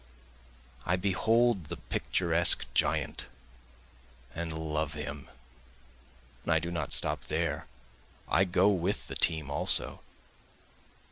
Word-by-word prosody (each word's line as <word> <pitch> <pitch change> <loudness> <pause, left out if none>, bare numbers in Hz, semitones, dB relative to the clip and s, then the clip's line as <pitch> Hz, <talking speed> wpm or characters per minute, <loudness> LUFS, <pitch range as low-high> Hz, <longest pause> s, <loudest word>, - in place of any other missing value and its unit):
I 90 - +1
behold 100 +2 +1
the 85 +2 -6
picturesque 85 -1 +1
giant - - -1 1.1
and 80 0 -4 0.2
love 75 -1 -2
him, 75 -2 -7 1.1
and - - -3
I 80 - +4
do 85 +2 -3
not 85 -1 -4
stop - - +3
there, - - -2 0.6
I 95 - +3
go 95 +2 +3
with 95 0 -1
the - - -8
team 80 -4 -1
also. 70 - +4
85 Hz, 110 wpm, -29 LUFS, 80-95 Hz, 1.1 s, I